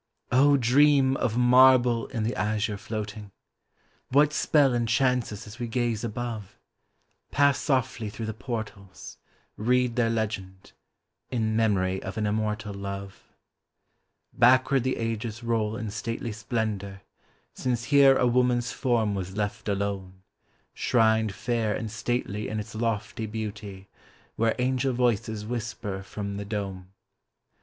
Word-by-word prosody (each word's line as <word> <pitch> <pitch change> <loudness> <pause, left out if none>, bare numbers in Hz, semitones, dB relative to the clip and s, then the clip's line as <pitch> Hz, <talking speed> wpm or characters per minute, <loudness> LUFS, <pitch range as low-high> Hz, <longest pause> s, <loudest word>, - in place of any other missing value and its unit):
] 140 +1 +5
DREAM 135 +2 +4
of 115 -1 -1
marble 125 -1 +5
in 115 -4 -3
the 115 +3 -1
azure 105 0 -1
floating! 105 -1 -6 0.8
What 145 +3 +4
spell 145 -4 +3
enchants 120 +1 +1
us 105 +2 -7
as 110 +3 -11
we 120 - -3
gaze 120 -2 -1
above? 115 -3 -5 0.7
Pass 140 -1 +3
softly 125 -6 -1
through 110 +2 -6
the 110 - -3
portals 110 -5 -7 0.2
— - - -38
read 125 +2 +1
their 115 -2 +3
legend, 100 -4 -4 0.2
— - - -55
" - - -55
In 110 -3 -1
memory 95 -4 +1
of 95 +3 -6
an 110 - 0
immortal 105 0 -2
love." 100 0 -6 1.1
Backward 130 +2 +4
the 130 0 -1
ages 115 0 -3
roll 110 -2 0
in 110 -4 -4
stately 115 +2 -4
splendor 105 -3 -3 0.5
Since 120 -2 -2
here 135 0 +6
a - - +2
woman's 125 0 +2
form 115 -5 0
was 95 0 -5
left 105 0 -3
alone, 95 -2 -3 0.5
Shrined 110 -3 +2
fair 110 0 -1
and 110 -1 -4
stately 105 -2 -2
in 110 - -3
its 105 - -7
lofty 110 0 -2
beauty 105 -3 -6 0.5
Where 115 0 +1
angel 130 +1 0
voices 115 -3 0
whisper 110 -4 -4
from 100 +1 -6
the 100 - -5
dome. 95 -3 -5
110 Hz, 135 wpm, -27 LUFS, 105-125 Hz, 1.1 s, here